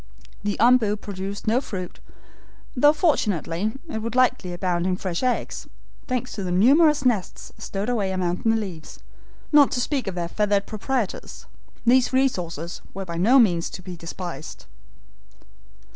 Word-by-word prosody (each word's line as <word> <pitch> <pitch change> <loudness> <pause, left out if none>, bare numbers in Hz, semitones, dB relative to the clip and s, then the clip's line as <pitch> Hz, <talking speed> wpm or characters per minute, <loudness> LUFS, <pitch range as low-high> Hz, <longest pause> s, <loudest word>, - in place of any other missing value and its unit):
The 205 0 -1
OMBU 225 -3 +4
produced 200 0 -6
no 230 +4 +2
fruit, 185 -8 -6 0.8
though 290 +4 +6
fortunately, 210 - 0
it 260 -8 -4
would 230 +1 -4
likely 255 -7 +2
abound 175 0 -1
in 185 -1 0
fresh 180 -3 -3
eggs, 255 -1 -2 0.4
thanks 255 -1 -2
to 200 - -5
the 185 - -3
numerous 280 - +4
nests 215 -8 -1
stowed 195 +2 -4
away 215 -6 0
among 180 -1 -1
the 225 0 +2
leaves, 190 -8 -5 0.5
not 295 -2 +7
to - - 0
speak 260 -1 -1
of 190 - -3
their 170 -1 -2
feathered 205 +1 +1
proprietors. 220 0 -3 0.4
These 255 +2 +4
resources 175 - -1
were 195 0 -4
by 170 -2 -5
no 225 +10 +5
means 180 -9 +3
to 185 - -9
be 180 0 -7
despised. 170 -1 -7
205 Hz, 150 wpm, -24 LUFS, 180-250 Hz, 0.8 s, not